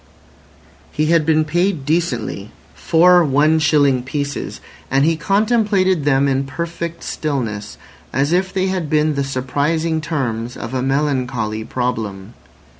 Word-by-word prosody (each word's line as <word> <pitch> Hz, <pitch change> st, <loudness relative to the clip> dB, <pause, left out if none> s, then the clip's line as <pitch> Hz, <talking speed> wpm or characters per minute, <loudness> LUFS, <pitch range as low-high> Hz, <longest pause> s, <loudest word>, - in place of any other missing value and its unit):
He 155 Hz, +1 st, 0 dB
had 160 Hz, -2 st, +2 dB
been 155 Hz, -1 st, +3 dB
paid 175 Hz, -1 st, 0 dB
decently—four 160 Hz, -, +1 dB
one 150 Hz, +2 st, +3 dB
shilling 145 Hz, -4 st, +3 dB
pieces—and 140 Hz, 0 st, -3 dB
he 165 Hz, +1 st, +2 dB
contemplated 195 Hz, -, +1 dB
them 140 Hz, -1 st, +3 dB
in 135 Hz, 0 st, 0 dB
perfect 170 Hz, +2 st, -5 dB
stillness, 115 Hz, -9 st, -3 dB, 0.3 s
as 140 Hz, +3 st, 0 dB
if 185 Hz, +1 st, +1 dB
they 190 Hz, -1 st, 0 dB
had 185 Hz, -5 st, -2 dB
been 155 Hz, 0 st, +2 dB
the 140 Hz, -1 st, -1 dB
surprising 145 Hz, +5 st, -1 dB
terms 125 Hz, -7 st, -3 dB
of 115 Hz, +2 st, -6 dB
a 130 Hz, -, -1 dB
melancholy 130 Hz, -5 st, -1 dB
problem. 110 Hz, -4 st, -4 dB
145 Hz, 120 wpm, -19 LUFS, 130-165 Hz, 0.3 s, been